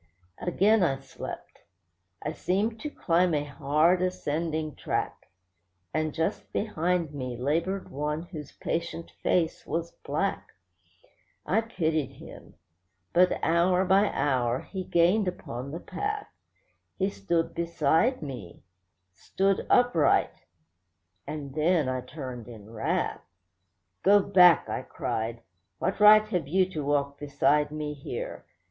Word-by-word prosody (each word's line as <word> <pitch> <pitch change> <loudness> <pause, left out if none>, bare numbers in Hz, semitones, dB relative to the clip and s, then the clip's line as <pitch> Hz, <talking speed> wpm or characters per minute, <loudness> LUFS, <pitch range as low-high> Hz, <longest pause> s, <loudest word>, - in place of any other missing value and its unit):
Again 200 +5 +3
I 140 -7 +2
slept. 135 -1 -9 0.6
I 150 - -2
seemed 205 +7 -1
to 300 - -4
climb 175 - +2
a 145 - 0
hard, 150 +5 +2
ascending 160 -3 -2
track; - - -3 0.7
And 155 0 0
just 160 +2 -2
behind 175 -5 -1
me 130 -4 -5
laboured 165 +9 -1
one 150 +3 -2
whose 155 -5 -9
patient 170 0 -4
face 165 -3 +1
was 170 +1 -2
black. - - -3 0.9
I 220 +4 +2
pitied 160 - -1
him; - - -13 0.6
but 180 +1 +4
hour 180 +3 +3
by 195 +3 +4
hour 125 -3 0
he 190 -1 -6
gained 180 +4 +3
upon 130 -7 -5
the 160 +4 -5
path; 415 - -4 0.7
He 195 +1 0
stood 170 -4 -1
beside 170 - +1
me, 125 - -8 0.5
stood 195 - 0
upright—and 90 - -1
then 155 -1 +2
I 130 0 -1
turned 125 -3 -8
in 110 -3 -11
wrath. 110 -1 -1 0.8
'Go 205 +2 +6
back!' 180 -4 +6
I - - -3
cried. 115 +1 -4 0.3
'What - - -2
right 215 +1 +8
have 175 -8 -1
you 185 +4 +3
to 155 -4 -3
walk 140 0 0
beside 145 0 +2
me 150 0 -4
here? 480 - -6
160 Hz, 120 wpm, -28 LUFS, 140-185 Hz, 0.9 s, right